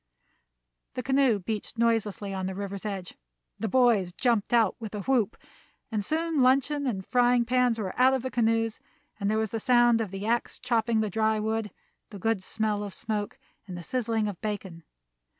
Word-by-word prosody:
The 250 - -3
canoe 265 -3 +3
beached 210 +3 -5
noiselessly 215 -4 0
on 190 -1 -3
the 190 - -4
river's 200 +1 -5
edge, 195 -3 -5 0.5
the 225 - -1
boys 230 -7 +3
jumped 230 +1 0
out 230 -5 +3
with 220 -2 -6
a 205 - -3
whoop, 230 -2 +1 0.5
and 215 -2 -1
soon 320 +3 0
luncheon 275 +3 +3
and 195 -6 -2
frying 245 -1 +3
pans 250 -1 +2
were 195 -4 -3
out 260 +1 +6
of 260 - -3
the 260 - -3
canoes, 225 -1 +1 0.4
and 200 -1 0
there 215 - +1
was 220 -1 -1
the 225 - -2
sound 240 -1 +4
of 215 - -3
the 195 +2 -6
axe 235 +2 0
chopping 230 -2 +1
the 215 -2 -2
dry 220 +1 +1
wood, 220 0 -1 0.4
the 205 - -9
good 210 0 0
smell 215 0 -1
of 200 -3 -6
smoke, 210 -1 -3 0.3
and 180 -2 -6
the 175 - -7
sizzling 225 -1 -1
of 200 -4 -6
bacon. 195 -6 -5
220 Hz, 185 wpm, -27 LUFS, 205-240 Hz, 0.5 s, out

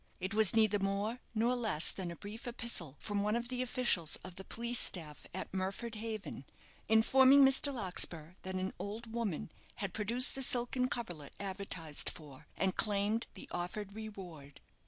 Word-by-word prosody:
It 190 +2 -3
was 220 -1 +5
neither 215 -2 +4
more 200 +4 -1 0.2
nor 235 +3 +2
less 220 -10 +3
than 185 -3 -4
a 170 - -6
brief 210 +7 -8
epistle 230 - -2
from 205 -1 -2
one 210 +2 +1
of 240 0 -2
the 250 -1 -2
officials 240 - +2
of 185 - -7
the 190 - -8
police 235 +3 0
staff 155 -5 +2
at 185 - -5
Murford 195 +5 -3
Haven, 215 -9 -5 0.5
informing 265 +5 +7
Mr. 270 +1 +5
Larkspur 180 - 0
that 190 0 -5
an 185 +1 -2
old 220 +3 -6
woman 210 -10 -2 0.2
had 200 -3 -4
produced 235 +5 0
the 270 - -4
silken 250 0 +1
coverlet 175 - -5
advertised 190 -6 -4
for, 145 -5 -12
and 190 0 +1
claimed 210 +2 +2
the - - -9
offered 190 +3 -4
reward. 185 -10 -9
205 Hz, 165 wpm, -34 LUFS, 185-235 Hz, 0.5 s, informing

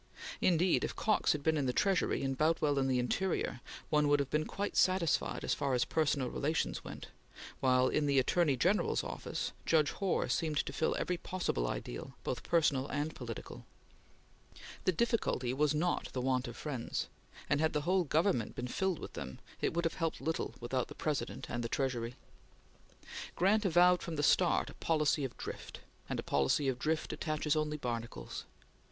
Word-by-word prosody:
Indeed, 180 0 +3
if - - -2
Cox 215 - +2
had 150 -2 -4
been 160 0 +2
in 140 -3 0
the - - +2
Treasury 195 -5 +1
and 135 0 0
Boutwell 150 -1 +2
in 135 - +1
the 130 -1 +2
Interior, 125 0 -1 0.3
one 150 -1 +4
would 145 0 +4
have 140 -1 -2
been 155 0 +1
quite 200 +1 -3
satisfied 185 -3 +2
as - - +1
far 140 -3 0
as 125 - +2
personal 145 -4 +1
relations 155 +3 -1
went, - - -8 0.5
while, 130 0 +4
in 145 +2 +1
the 140 -1 +2
Attorney 140 +1 +3
General's 185 +11 +2
Office, - - -4
Judge 155 -3 +3
Hoar 195 -3 0
seemed 155 -3 0
to 140 - -5
fill 160 - +1
every 180 - -1
possible 170 - -2
ideal, - - -5
both - - -2
personal 145 -5 +2
and 145 +2 -2
political. 115 -3 -7 1.2
The - - +5
difficulty 185 - 0
was 150 +2 +2
not 175 +3 0
the 130 - -2
want 130 0 +1
of - - -8
friends, 135 -6 -3 0.4
and 145 - +2
had 160 - +2
the 150 - +1
whole 180 +4 +2
government 160 - +1
been 125 - -3
filled 190 +6 0
with - - -8
them, 65 -2 -6 0.2
it - - +1
would 170 0 0
have 165 - +1
helped 165 -2 -2
little 160 0 -2
without 125 +1 -1
the - - -10
President 145 -6 -2
and 120 0 -3
the 115 - -3
Treasury. 125 -3 -1 1.2
Grant 210 +4 +3
avowed 180 0 +5
from 170 -3 -4
the 145 - -1
start 175 +4 +3
a - - -13
policy 150 -2 +1
of 130 - -4
drift; - - -7 0.3
and - - -2
a - - -3
policy 70 - +2
of 130 -2 0
drift 155 +3 -1
attaches 155 -1 -1
only 155 0 0
barnacles. 115 - -5
150 Hz, 185 wpm, -33 LUFS, 130-170 Hz, 1.2 s, The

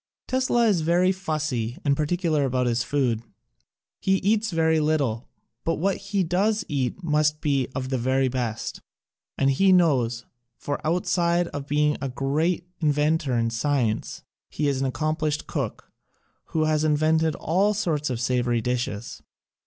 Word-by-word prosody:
Tesla 255 -2 +2
is 200 -7 +3
very 175 +3 +3
fussy 155 -10 -2
and 140 -1 +3
particular 155 0 0
about 130 -1 0
his 120 0 +1
food: 125 -6 0 0.8
he 190 - +2
eats 215 +2 +2
very 160 -2 +2
little, 145 -7 0 0.3
but 165 - 0
what 195 +4 0
he 200 -1 -1
does 200 +6 +1
eat 140 +5 -2
must 150 -1 +1
be 140 -4 0
of 130 -1 -3
the 130 -2 -1
very 130 +2 +1
best. 120 -3 -3 0.6
And 135 0 +3
he 190 +8 +4
knows, 130 -10 +2 0.3
for 145 - -4
outside 170 +1 +1
of 145 -1 -6
being 150 +1 +2
a 135 - -2
great 155 +7 -1
inventor 150 -3 +1
in 115 0 0
science 120 -2 -1 0.3
he 150 - -1
is 135 -2 0
an 135 - +1
accomplished 155 +2 -1
cook - - -4 0.5
who 155 - -1
has 155 -1 +1
invented 155 +1 +2
all 195 +6 +1
sorts 155 -8 -1
of 125 -3 -2
savory 120 -1 +1
dishes. 120 -2 -3
150 Hz, 150 wpm, -25 LUFS, 130-170 Hz, 0.8 s, he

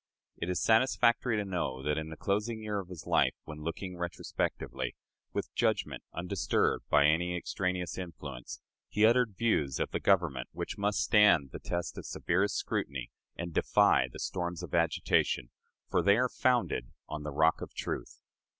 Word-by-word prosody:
It 85 - -3
is 90 -2 0
satisfactory 115 +1 +3
to 105 - -1
know 85 -9 -2
that 75 +1 +1
in 80 0 -5
the 80 - -8
closing 105 +3 -1
year 105 -1 -1
of 95 - -7
his 90 -3 -9
life, - - +3
when 75 -1 -9
looking 90 +3 -5
retrospectively, 85 0 -3 0.4
with - - -4
judgment - - 0
undisturbed 90 +1 0
by 70 -1 +5
any 90 +3 +2
extraneous 90 0 -2
influence, 85 -8 -7 0.3
he 105 +1 +3
uttered 115 -2 +3
views 75 - +1
of - - -1
the - - -1
Government 80 -10 +2
which - - -4
must 100 0 +1
stand 95 - +5
the - - -7
test 85 0 -3
of - - -8
severest 95 +4 0
scrutiny 65 -3 -3 0.2
and 85 0 -5
defy 65 - +4
the - - -9
storms 90 -1 -3
of 85 - -8
agitation, 85 -6 +1 0.4
for - - +2
they 100 +1 +5
are 125 +1 +2
founded 120 - +1 0.2
on 75 - -5
the 75 - -4
rock 80 +3 +3
of - - -8
truth. - - -5
90 Hz, 170 wpm, -31 LUFS, 75-105 Hz, 0.4 s, by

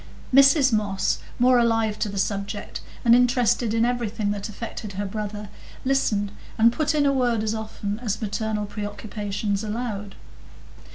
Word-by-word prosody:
Mrs 275 -1 +6
Moss, 200 -3 0 0.2
more 250 0 +5
alive 225 -2 +1
to 210 - -1
the 200 - -6
subject, 200 +1 -3 0.2
and 235 - +7
interested 245 -2 +3
in 225 +1 +2
everything 230 -4 -1
that 205 +1 -4
affected 210 -1 -7
her 200 +2 -3
brother, 210 0 -5 0.4
listened 215 -7 +1 0.3
and 230 +1 +5
put 310 +3 0
in 290 -1 +3
a 280 - +3
word 240 -4 +1
as 220 0 0
often 215 -1 -4
as 215 -4 -2
maternal 215 0 -2
preoccupations 205 0 -3
allowed. 210 -2 -4
220 Hz, 150 wpm, -24 LUFS, 205-240 Hz, 0.4 s, and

